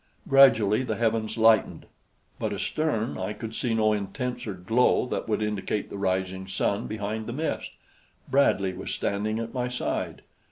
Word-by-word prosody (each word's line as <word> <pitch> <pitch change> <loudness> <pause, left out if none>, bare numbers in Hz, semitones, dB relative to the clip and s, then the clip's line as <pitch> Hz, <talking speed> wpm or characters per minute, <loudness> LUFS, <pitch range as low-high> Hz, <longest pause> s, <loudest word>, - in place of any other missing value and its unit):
Gradually 115 -6 +6
the 130 - -2
heavens 115 -1 0
lightened; 110 -2 +3 0.5
but - - -1
astern 140 -8 -1
I 95 +3 -2
could 110 +1 -7
see 120 -3 0
no 110 -1 +3
intenser 105 +1 -3
glow 110 +10 +2
that 125 - -4
would 110 0 +1
indicate 105 0 -2
the - - -5
rising 95 0 -1
sun 100 +1 -1
behind 110 +1 -4
the 120 - -4
mist. 155 +5 -2 0.6
Bradley 100 -9 +2
was - - -6
standing 105 +2 -1
at 115 0 -4
my 125 -1 -1
side. 125 0 -3
110 Hz, 155 wpm, -26 LUFS, 100-120 Hz, 0.6 s, Gradually